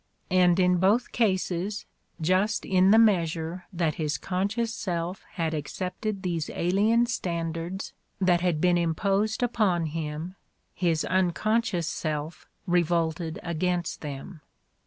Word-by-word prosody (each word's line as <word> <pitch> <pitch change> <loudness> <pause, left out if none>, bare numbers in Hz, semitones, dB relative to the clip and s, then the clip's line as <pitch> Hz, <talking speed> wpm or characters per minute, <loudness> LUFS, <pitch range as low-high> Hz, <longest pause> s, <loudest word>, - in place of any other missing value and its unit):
And 180 -1 +4
in 180 -1 +4
both 205 +7 +2
cases, 195 -2 0 0.3
just 185 +6 +1
in 185 0 +4
the 215 - +7
measure 175 -5 +2
that 170 -3 0
his 150 0 0
conscious 205 +5 -1
self 175 -2 -3
had 165 -2 -1
accepted 185 +7 -4
these 170 -4 -2
alien 210 +7 +3
standards 170 -4 -3 0.3
that 180 -2 +3
had 175 -4 +1
been 175 +1 +3
imposed 195 +7 0
upon 205 -8 +1
him, 155 +2 -4 0.4
his 165 -4 0
unconscious 190 +1 +1
self 155 0 -4 0.2
revolted 170 -2 0
against 175 0 -1
them. 150 +2 -7
180 Hz, 115 wpm, -27 LUFS, 165-195 Hz, 0.4 s, the